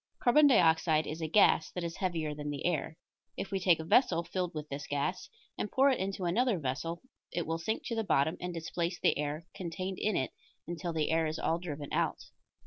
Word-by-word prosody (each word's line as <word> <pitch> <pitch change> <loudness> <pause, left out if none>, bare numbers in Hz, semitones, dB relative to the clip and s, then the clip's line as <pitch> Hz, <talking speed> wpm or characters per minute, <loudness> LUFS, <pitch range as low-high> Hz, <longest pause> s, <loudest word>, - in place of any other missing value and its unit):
Carbon 290 +5 +6
dioxide 160 - +4
is 160 +2 -5
a 160 - -1
gas 165 -2 +4
that 180 - -3
is 170 -1 -4
heavier 165 -5 -1
than 150 0 -5
the 145 -1 -4
air. 160 -2 -1 0.4
If 195 - -4
we 195 - 0
take 180 -3 +4
a - - -3
vessel 170 -2 +3
filled 180 0 -3
with 155 0 -5
this 140 0 -6
gas 145 +6 -2 0.3
and 205 - -2
pour 275 +1 +5
it 260 - 0
into 190 0 -3
another 225 +5 +2
vessel 155 +4 -3 0.3
it 175 - -2
will 165 +1 -2
sink 220 +7 -2
to 230 - -2
the 225 - 0
bottom 160 -4 +2
and 180 0 -3
displace 170 +1 -3
the - - +3
air 150 +2 -3
contained 185 +1 -4
in 215 -2 +1
it 130 - -1 0.4
until 175 0 -3
the 160 -2 0
air 160 0 +2
is 155 +1 -3
all 165 - 0
driven 150 -5 -6
out. - - 0
170 Hz, 220 wpm, -31 LUFS, 155-185 Hz, 0.4 s, Carbon